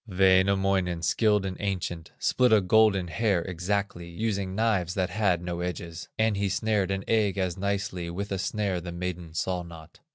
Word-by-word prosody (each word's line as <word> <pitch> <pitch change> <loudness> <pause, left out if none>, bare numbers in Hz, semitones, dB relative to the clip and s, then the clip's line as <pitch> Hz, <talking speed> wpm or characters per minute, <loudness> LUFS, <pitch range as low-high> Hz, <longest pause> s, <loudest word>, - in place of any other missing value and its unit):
Wainamoinen, 95 -2 +3
skilled 105 +1 +2
and 95 -1 -3
ancient, 90 -4 -3
Split 125 -2 +2
a 110 - +7
golden 100 -1 +3
hair 90 +1 +1
exactly, 95 0 -3
Using 100 0 -2
knives 100 -5 +1
that 95 -2 0
had 95 -5 +1
no 85 -1 -3
edges; 85 -1 -5
And 110 -1 +2
he 100 0 0
snared 100 0 0
an 95 0 -2
egg 105 -3 +2
as 90 -3 -1
nicely 95 -3 -2
With 100 +4 -5
a 95 - -1
snare 95 -1 -1
the 85 0 -6
maiden 85 -2 -5
saw 90 +3 -1
not. 85 -2 -12
95 Hz, 170 wpm, -27 LUFS, 90-100 Hz, -, a